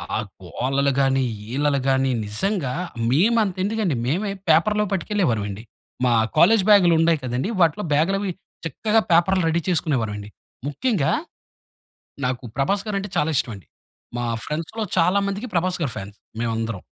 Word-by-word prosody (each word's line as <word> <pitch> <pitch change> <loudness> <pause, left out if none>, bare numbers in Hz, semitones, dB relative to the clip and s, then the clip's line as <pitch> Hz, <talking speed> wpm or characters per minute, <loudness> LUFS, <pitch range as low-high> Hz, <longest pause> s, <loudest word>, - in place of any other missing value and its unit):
ఆ - - +1 0.3
గోలలు 135 +2 0
గాని, 135 -1 +2 0.3
ఈలలు 145 0 +1
గాని 135 0 +2
నిజంగా 135 - -1 0.4
మేము 215 - +3
అంత 195 -4 -3
ఎందుకండి, 205 - 0
మేమే 190 - -1 0.2
పేపర్‌‌లో 210 +7 +3
పట్టుకెళ్ళేవారమండి. 120 - -1 0.4
మా 125 - +3 0.3
కాలేజ్ 215 +4 +6
బ్యాగ్‌లు 185 -5 +6
ఉండాయి 165 -2 +3
కదండీ! 125 - -2
వాటిలో 170 +4 +2
బ్యాగ్‌లవి 195 +6 +1 0.3
చక్కగా 215 +8 +1
పేపర్‌లు 175 +2 +4
రెడీ 170 +1 +1
చేసుకునేవారమండి. 115 - -1 0.4
ముఖ్యంగా, 150 - 0 1.1
నాకు 125 0 -2
ప్రభాస్ 195 +9 +1
గారు 205 -2 -1
అంటే 200 0 -6
చాలా 150 - +2
ఇష్టం 115 - 0
అండి. 95 -7 -15 0.5
మా 120 - -2 0.2
ఫ్రెండ్స్‌లొ 165 +9 -4
చాలా 180 +4 +4
మందికి 205 +5 -4
ప్రభాస్ 180 +1 0
గారు 130 - -2
ఫాన్స్. 100 +1 -8 0.2
మేము 120 -1 -1
అందరం. 115 -4 -3
165 Hz, 140 wpm, -22 LUFS, 130-195 Hz, 1.1 s, కాలేజ్